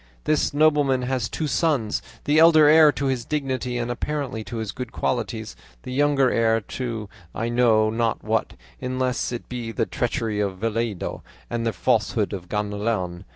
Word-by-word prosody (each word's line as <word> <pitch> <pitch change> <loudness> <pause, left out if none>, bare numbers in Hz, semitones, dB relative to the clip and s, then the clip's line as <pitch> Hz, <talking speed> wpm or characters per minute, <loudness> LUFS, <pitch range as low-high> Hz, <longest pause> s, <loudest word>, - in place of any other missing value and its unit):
This 155 - +1
nobleman 145 -3 +3
has 125 -3 -1
two 160 - -3
sons, 145 -7 0 0.2
the 150 +2 +3
elder 160 -2 +7
heir 155 0 +7
to 140 - -3
his 130 -3 0
dignity 130 -4 -2
and 120 0 -2
apparently 135 -3 -3
to 120 - -6
his 110 -2 -3
good 125 0 -6
qualities; 115 - -2 0.3
the 125 - -6
younger 140 -1 +3
heir 115 -1 +2
to 115 -1 -5 0.3
I 115 +1 -2
know 115 -3 +3
not 115 -1 -1
what, - - -1 0.3
unless 130 -1 -1
it 120 - -6
be 120 -2 -5
the - - 0
treachery 115 -3 -2
of 100 -2 -1
Vellido 115 -1 -2 0.3
and 115 -1 -1
the - - +1
falsehood - - +1
of 90 -3 -7
Ganelon. 105 -3 -2
120 Hz, 165 wpm, -24 LUFS, 110-135 Hz, 0.3 s, elder